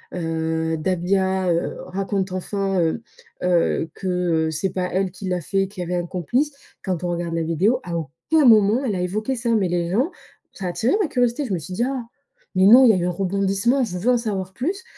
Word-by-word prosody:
heu, 160 -1 -1
Dahbia, 190 +2 0
heu, 170 0 -1
raconte 195 0 -2
enfin, 195 +1 -1
heu 165 +8 -1 0.4
heu, 170 -2 +1
que, 190 - -6 0.4
heu, - - -2
c'est 170 +4 -2
pas 180 -1 -2
elle 190 0 0
qui 190 +1 -7
l'a 180 -1 -1
fait, 195 +4 0
qu'il 190 -1 -8
y - - -1
avait 180 - -2
un 175 - -7
complice». 240 - -1 0.3
Quand 185 -3 -2
on 175 - -1
regarde 170 -1 -3
la 165 - 0
vidéo, 185 +10 +1
à 175 -1 -4
aucun 165 - 0
moment 220 +1 +5
elle 220 -7 -1
a 180 - -2
évoqué 215 +8 -2
ça. 235 0 -3
Mais 200 -4 +2
les 175 -1 -1
gens 255 - +1 0.4
Ça 195 - -7
a - - 0
attiré 225 +7 0
ma 385 - +1
curiosité. 245 +1 0
Je 215 - -3
me 175 - -1
suis 180 +5 -8
dit: 235 - +1
«Ah 265 -2 -3 0.5
mais 185 0 +4
non, 240 +6 +9
il - - +7
y - - +6
a 185 - +1
eu 175 - -1
un 180 - 0
rebondissement. 195 +7 +1
Je 180 -6 -3
veux 235 +7 0
en 250 - +4
savoir 195 -5 -3
plus». 365 - -3
190 Hz, 230 wpm, -22 LUFS, 175-225 Hz, 0.5 s, non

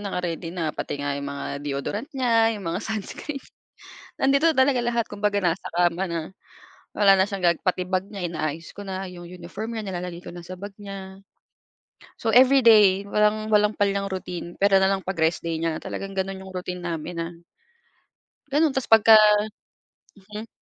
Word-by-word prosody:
naka-ready 180 -4 -3
na, 165 -3 -3
pati 145 - -4
nga 145 0 -2
'yung 140 0 -4
mga 140 0 -5
deodorant 145 - -4
niya, 230 -3 +3
'yung 200 - -9
mga 170 +4 -2
sunscreen 220 +7 -5 0.8
nandito 275 +4 +4
talaga 260 -3 +3
lahat, 235 -1 0
kumbaga 205 0 0
nasa 175 0 0
kama 175 +2 +1
na, 170 -2 -2 0.8
wala 200 -2 +7
na 190 - +4
siyang 190 -3 -1
ga 170 - +6
pati 180 -1 0
bag 190 +2 -2
niya 195 -4 -4
inaayos 160 -1 -4
ko 205 - -8
na, 190 -1 -5
'yung 175 -1 -10
uniform 180 +5 -7
niya 220 -3 -5
nilalagay 180 -2 -5
ko 175 - -10
na 175 - -8
sa 185 +1 -9
bag 200 +1 -8
niya. 195 -1 -9 1.0
So 225 0 0
everyday, 225 -7 +6
walang 210 +1 +1
walang 210 -1 +2
palyang 200 -1 +1
niyang 195 - -5
routine 180 -2 -5
puwera 195 -1 +4
na 190 - +3
lang 190 -1 -2
'pag 190 - -2
rest 160 +2 +2
day 165 -1 -3
niya, 160 0 -2
talagang 195 0 -6
gano'n 195 0 -2
'yung 190 - -10
routine 180 -1 -5
namin 170 0 -4
na 165 +1 -3 1.2
Gano'n 300 -1 +3
tas 265 - -1
pagka 225 0 +7 1.0
Mhm. 210 +3 -9
195 Hz, 180 wpm, -24 LUFS, 175-210 Hz, 1.2 s, wala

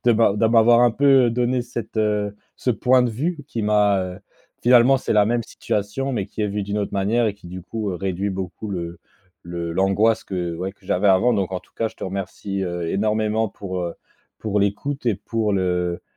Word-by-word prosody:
de 120 - +5
m'a 110 -3 +3
d'a 110 +2 +2
m'avoir 115 +1 +6
un 120 0 +5
peu, 140 +5 0 0.2
heu, - - 0
donné 125 +1 0
cette, 120 -2 -7
heu, 105 -1 0 0.2
ce - - -4
point 125 +2 +3
de 125 - +2
vue 155 +10 -2
qui 115 -6 -3
m'a, 105 -1 +3
heu 90 0 -7 0.4
finalement, 125 +2 +6
c'est 130 - -1
la 105 -1 +5
même 120 +2 0
situation, 110 +6 -3
mais 100 -5 -2
qui 105 - -5
est 105 - 0
vue 100 0 -2
d'une 100 +1 -3
autre 105 -1 -2
manière 105 +4 +1
et 105 - 0
qui, 100 -3 -16
du 90 0 -7
coup, 105 +2 -4
heu, - - -4
réduit 95 +2 -2
beaucoup 95 +2 -5
le 85 -2 -5 0.4
le 85 -1 -5
l'angoisse 95 +5 +2
que, 90 -3 -3
ouais, 90 +3 -3
que 100 - -29
j'avais 95 +2 +1
avant. 95 +6 +4
Donc 100 -4 0
en 90 - -2
tout - - -28
cas, 115 - -1
je - - -18
te - - -6
remercie, 100 +1 -4
heu, 85 -2 -3
énormément 110 +1 +1
pour, 95 -2 -5
heu, 85 -1 -3 0.4
pour 105 -1 -1
l'écoute 125 +8 -2
et 115 - +3
pour 110 +1 -2
le, 95 - +1 0.3
heu, - - -12
105 Hz, 225 wpm, -22 LUFS, 95-115 Hz, 0.4 s, m'avoir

